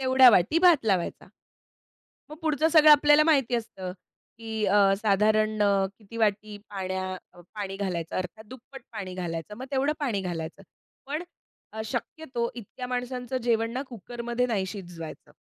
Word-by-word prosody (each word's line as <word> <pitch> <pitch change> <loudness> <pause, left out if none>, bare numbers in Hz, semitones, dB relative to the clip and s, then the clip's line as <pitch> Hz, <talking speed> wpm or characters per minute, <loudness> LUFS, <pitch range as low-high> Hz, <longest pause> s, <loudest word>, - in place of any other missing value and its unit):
तेवढ्या 260 -1 +7
वाटी 200 - +3
भात 340 -7 +5
लावायचा. 190 -5 -1 1.0
मग 305 - -8
पुढचं 315 -1 +2
सगळं 310 -2 +7
आपल्याला 295 +1 +6
माहिती 270 -6 +3
असतं 195 -6 -5 0.5
की 220 -1 -2
अ, 200 0 +4
साधारण 215 +1 +2
अ, 200 -1 +3
किती 230 +1 -11
वाटी 210 -1 0
पाण्या 185 -1 -3 0.4
पाणी 195 -2 -4
घालायचं 175 -5 -3
अर्थात 185 +4 -4
दुप्पट 260 +1 -12
पाणी 200 -5 -6
घालायचं. 175 +2 -5
मग 255 - -6
तेवढं 275 +2 +1
पाणी 235 -9 -1
घालायचं. 170 0 -5 0.4
पण 300 +5 -3 0.5
अ, 220 0 -5
शक्यतो 240 +1 -3
इतक्या 245 +2 -8
माणसांचं 250 0 -3
जेवण 230 -1 +1
ना 255 +3 -3
कुकरमध्ये 240 +2 -3
नाही 215 -6 -1
शिजवायचं. 175 -5 -9
220 Hz, 145 wpm, -27 LUFS, 195-260 Hz, 1.0 s, तेवढ्या